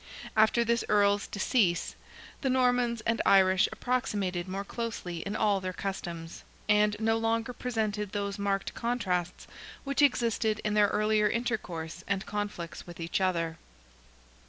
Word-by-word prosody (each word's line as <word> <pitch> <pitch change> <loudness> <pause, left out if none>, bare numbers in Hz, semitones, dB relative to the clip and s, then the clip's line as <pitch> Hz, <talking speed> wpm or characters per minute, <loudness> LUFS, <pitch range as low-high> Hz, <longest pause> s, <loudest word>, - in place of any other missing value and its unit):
After 220 +2 +4
this 235 0 +1
Earl's 205 0 +3
decease, 200 -4 +1 0.5
the 270 - 0
Normans 245 -2 +2
and 230 +1 0
Irish 190 -1 +5
approximated 200 -8 -1
more 195 +1 -3
closely 200 -6 -5
in 200 +5 -4
all 205 -3 +2
their 185 0 -3
customs, 170 -4 -5 0.2
and 210 0 +4
no 225 0 +2
longer 230 +2 0
presented 215 -5 -2
those 200 0 -3
marked 200 -1 -1
contrasts 185 -8 -2 0.4
which 275 +1 0
existed 230 -5 +2
in 210 - 0
their 210 -1 +5
earlier 210 0 +2
intercourse 185 -8 -3
and 195 -1 -1
conflicts 205 -6 -5
with 175 -1 -10
each 165 +3 -2
other. 170 -3 0
210 Hz, 135 wpm, -29 LUFS, 185-230 Hz, 0.5 s, Irish